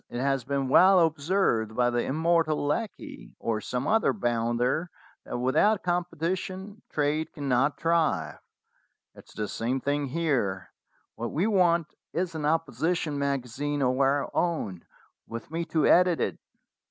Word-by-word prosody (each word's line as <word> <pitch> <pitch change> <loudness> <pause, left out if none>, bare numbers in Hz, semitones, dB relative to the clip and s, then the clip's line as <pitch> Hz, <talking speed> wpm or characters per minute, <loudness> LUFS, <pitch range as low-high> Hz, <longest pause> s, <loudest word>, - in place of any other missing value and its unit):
It 120 - -5
has 135 -1 0
been 140 0 -1
well 185 +7 +6
observed 155 - +1
by 120 0 +2
the 120 - 0
immortal 160 0 +1
Lecky, 150 - -4
or 110 -2 -2
some 125 +2 -3
other 225 +1 +3
bounder, 120 - 0 0.4
that - - -4
without 130 - +2
competition 180 +3 -3
trade 150 +1 -1
cannot 140 -1 0
thrive. 160 - 0 0.7
It - - -15
is - - -18
the 105 -1 -2
same 125 +6 -2
thing 145 +2 -1
here. 130 - -1 0.4
What 120 - -5
we 170 +6 0
want 175 -6 +3 0.3
is 180 0 -1
an 155 -2 -3
opposition 160 0 0
magazine 140 +1 -2
of 130 +1 +1
our 140 +1 +2
own, 110 - -1 0.4
with 115 +4 -8
me 165 +1 -2
to 160 -2 +1
edit 180 -1 +5
it." - - -2
145 Hz, 140 wpm, -27 LUFS, 125-170 Hz, 0.7 s, well